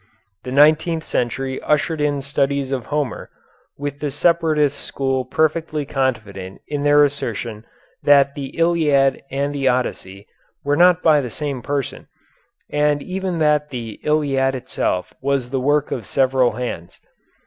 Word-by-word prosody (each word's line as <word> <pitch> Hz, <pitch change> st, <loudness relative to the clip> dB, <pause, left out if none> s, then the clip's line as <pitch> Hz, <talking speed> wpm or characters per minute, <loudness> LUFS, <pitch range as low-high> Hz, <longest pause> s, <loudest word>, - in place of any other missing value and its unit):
The 125 Hz, -, -7 dB
nineteenth 155 Hz, +4 st, +4 dB
century 130 Hz, +1 st, -2 dB
ushered 150 Hz, +1 st, 0 dB
in 145 Hz, -2 st, 0 dB
studies 140 Hz, -1 st, -1 dB
of 130 Hz, -4 st, -3 dB
Homer, 145 Hz, -5 st, -3 dB, 0.5 s
with 145 Hz, 0 st, -5 dB
the 150 Hz, -, -2 dB
separatist 150 Hz, -1 st, +1 dB
school 135 Hz, -1 st, -2 dB
perfectly 155 Hz, +1 st, 0 dB
confident 110 Hz, -9 st, -3 dB
in 145 Hz, -1 st, -3 dB
their 145 Hz, 0 st, +5 dB
assertion 115 Hz, -6 st, -3 dB, 0.4 s
that 140 Hz, -1 st, +5 dB
the 140 Hz, -2 st, -5 dB
Iliad 155 Hz, -5 st, +2 dB
and 140 Hz, +1 st, -2 dB
the 140 Hz, -2 st, -1 dB
Odyssey 105 Hz, -6 st, -2 dB, 0.4 s
were 145 Hz, +1 st, +1 dB
not 175 Hz, +1 st, +5 dB
by 155 Hz, -3 st, +5 dB
the 125 Hz, -, -5 dB
same 140 Hz, +1 st, -4 dB
person, 140 Hz, +1 st, -3 dB, 0.6 s
and 150 Hz, -1 st, +1 dB
even 185 Hz, -1 st, -3 dB
that 150 Hz, -1 st, +2 dB
the 115 Hz, -4 st, -6 dB
Iliad 135 Hz, -3 st, +1 dB
itself 125 Hz, -7 st, -2 dB
was 135 Hz, -2 st, -1 dB
the 135 Hz, -, 0 dB
work 145 Hz, +2 st, +1 dB
of 115 Hz, -6 st, -4 dB
several 130 Hz, -3 st, +2 dB
hands. 110 Hz, -8 st, -6 dB
140 Hz, 140 wpm, -20 LUFS, 130-150 Hz, 0.6 s, their